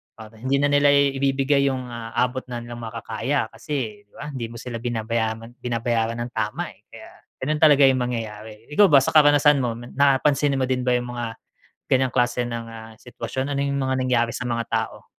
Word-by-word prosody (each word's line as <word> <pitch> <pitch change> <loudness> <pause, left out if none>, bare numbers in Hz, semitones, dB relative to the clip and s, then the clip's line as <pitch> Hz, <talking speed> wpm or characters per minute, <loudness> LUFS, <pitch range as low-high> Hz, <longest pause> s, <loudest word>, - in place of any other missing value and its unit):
para 110 -1 -12
hindi 130 +4 0
na 145 - +3
nila 145 0 +4
i 140 -1 +3
ibibigay 140 +1 +2
yung, 130 -1 -4
ah, 115 -1 -7
abot 125 +1 0
na 120 -1 -4
nilang 120 0 -8
makakaya. 115 +4 -2
Kasi 115 -9 -5
di - - -43
ba, 145 - -7
hindi 130 -4 -4
mo 115 - -9
sila 120 0 -6
binabayaran 115 0 -2
binabayaran 115 -1 -1
ng 120 +1 -5
tama, - - -2
eh. - - -30
Kaya - - -12 0.3
ganun 150 +3 -1
talaga 145 -2 +7
yung 130 -1 +2
mangyayari. 110 -2 -6
Ikaw 205 +2 +7
ba 140 - +8
sa - - -1
karanasan 145 -1 +6
mo, 120 -2 -1 0.2
napansin 140 0 +3
mo 130 - +2
din 130 -1 -1
ba 125 - +2
yung 125 0 -5
mga 115 -2 -5 0.5
ganyang 130 -1 +2
klase 120 0 +1
ng, 115 -1 -5
ah, 110 -1 -10
sitwasyon? 130 +3 -4
Ano 140 - -1
yung 140 0 -1
mga 130 0 0
nangyari 120 -2 +1
sa 125 - -4
mga 115 0 -1
tao? 110 -1 -3
125 Hz, 200 wpm, -23 LUFS, 115-140 Hz, 0.5 s, ba